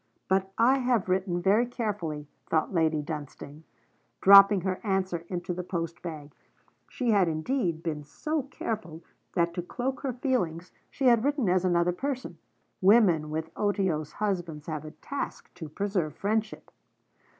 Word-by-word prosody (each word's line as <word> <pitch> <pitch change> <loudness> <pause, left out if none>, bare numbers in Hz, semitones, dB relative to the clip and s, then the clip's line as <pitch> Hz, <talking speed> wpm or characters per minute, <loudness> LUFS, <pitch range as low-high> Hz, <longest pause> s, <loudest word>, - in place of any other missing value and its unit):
But 190 0 +1
I 255 +4 +4
have 245 -7 +1
written 185 -1 0
very 215 +6 +4
carefully, 195 - -4 0.2
thought 160 +4 +1
Lady 160 -3 +1
Dunstane, 150 0 -8 0.5
dropping 200 0 +8
her 185 0 -2
answer 190 -4 -1
into 180 -1 -3
the 180 - -4
post 170 -2 -4
bag. 150 -4 -7 0.6
She 245 -3 -1
had, 200 -4 +4
indeed, 165 - -1
been 150 -3 -3
so 305 - -3
care 255 -4 -3
ful, 165 -5 -12 0.3
that 170 -2 +1
to 175 - -3
cloak 255 +9 -3
her 265 -2 -3
feelings, 180 - -1 0.2
she 275 - -3
had 235 -3 +5
written 285 -5 +1
as 180 0 +2
another 175 -1 +2
person. 255 - -4 0.4
Women 185 -7 +5
with 160 +1 -4
otiose 190 -7 -1
husbands 175 -7 -3
have 155 -2 -5
a - - -6
task 280 - -6
to 165 -4 -8
preserve 180 -3 -2
friendship. 215 +3 -2
185 Hz, 150 wpm, -28 LUFS, 160-220 Hz, 0.6 s, dropping